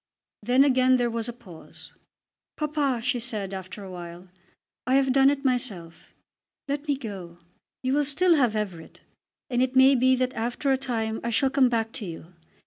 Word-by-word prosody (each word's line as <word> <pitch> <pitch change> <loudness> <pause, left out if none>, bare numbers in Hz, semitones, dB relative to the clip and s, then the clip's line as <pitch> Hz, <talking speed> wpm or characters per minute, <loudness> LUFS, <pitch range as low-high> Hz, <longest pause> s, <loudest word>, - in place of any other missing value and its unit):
Then 250 +5 +4
again 260 -2 +4
there 240 -1 0
was 230 0 -3
a - - -5
pause. 195 -9 -15 0.6
"Papa," 290 -5 -1
she 250 0 0
said 215 -5 -4
after 190 +2 -7
a 190 - -9
while, 175 0 -9 0.6
"I 260 - +3
have 270 -1 +3
done 270 0 +5
it 285 0 -2
myself. 215 -10 -2 0.5
Let 285 +2 -3
me 285 -2 +1
go. 195 -9 -8 0.5
You 255 +1 0
will 290 +1 +2
still 340 +6 +3
have 250 -8 +2
Everett. 190 -6 -5 0.5
And 245 0 +1
it 260 0 0
may 265 +1 +7
be 260 0 +3
that 255 0 -1
after 245 +5 -2
a - - +4
time 225 -4 -3
I 235 - -2
shall 265 +4 +1
come 270 -2 +4
back 225 -2 -1
to 220 - -5
you. 165 +1 -10
245 Hz, 185 wpm, -25 LUFS, 210-270 Hz, 0.6 s, may